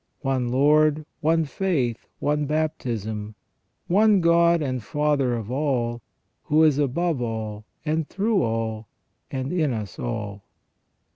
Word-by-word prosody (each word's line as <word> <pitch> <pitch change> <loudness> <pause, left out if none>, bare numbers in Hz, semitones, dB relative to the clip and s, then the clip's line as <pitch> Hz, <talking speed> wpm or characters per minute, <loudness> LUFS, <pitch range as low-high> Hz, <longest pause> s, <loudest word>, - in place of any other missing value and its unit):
One 130 -3 0
Lord, 150 +3 +3
one 160 +1 +2
faith, 140 - -1
one 150 0 0
baptism, 110 -9 -2 0.5
one 205 +2 +4
God 170 0 +4
and 130 -6 -2
Father 145 -1 +1
of 115 -1 -5
all, 125 -4 -1 0.4
who 155 +2 +4
is 150 -3 +4
above 150 +1 0
all, 110 -2 -4 0.2
and 155 0 -1
through 205 0 +1
all, 110 -2 -2 0.4
and 130 +4 -3
in 155 -7 +1
us 105 -5 -6
all." 105 -4 -4
140 Hz, 125 wpm, -24 LUFS, 115-155 Hz, 0.5 s, one